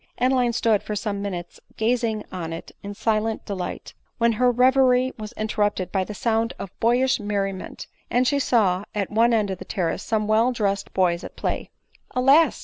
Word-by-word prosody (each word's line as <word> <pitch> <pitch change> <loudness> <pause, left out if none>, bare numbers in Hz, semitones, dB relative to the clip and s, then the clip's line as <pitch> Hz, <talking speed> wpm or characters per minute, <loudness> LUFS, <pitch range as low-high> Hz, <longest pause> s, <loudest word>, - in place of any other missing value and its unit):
Adeline 250 -1 +2
stood 225 -3 +2
for 210 - -4
some 205 -1 -3
minutes 180 -4 -5 0.2
gazing 225 -1 0
on 170 -3 -5
it 165 - -7
in 200 0 -7
silent 220 +1 -1
delight; 185 -4 -5 0.2
when 235 -1 +3
her 250 +3 +3
reverie 255 +1 +4
was 215 0 -6
interrupted 210 -4 -1
by 190 -2 +1
the 210 +2 -7
sound 225 +1 0
of 195 - -7
boyish 245 +3 +2
merriment, 200 -2 -3 0.2
and 250 +1 +2
she 285 +1 +2
saw, 200 -8 +2
at 200 -2 -2
one 230 +3 +4
end 215 -4 +1
of 185 - -5
the - - -6
terrace 185 -2 -2
some 215 -1 -1
well 225 +3 +3
dressed 200 -4 -1
boys 180 -2 +2
at - - -9
play.: - - -3 0.5
Alas 275 +6 +5
215 Hz, 180 wpm, -24 LUFS, 200-245 Hz, 0.5 s, Alas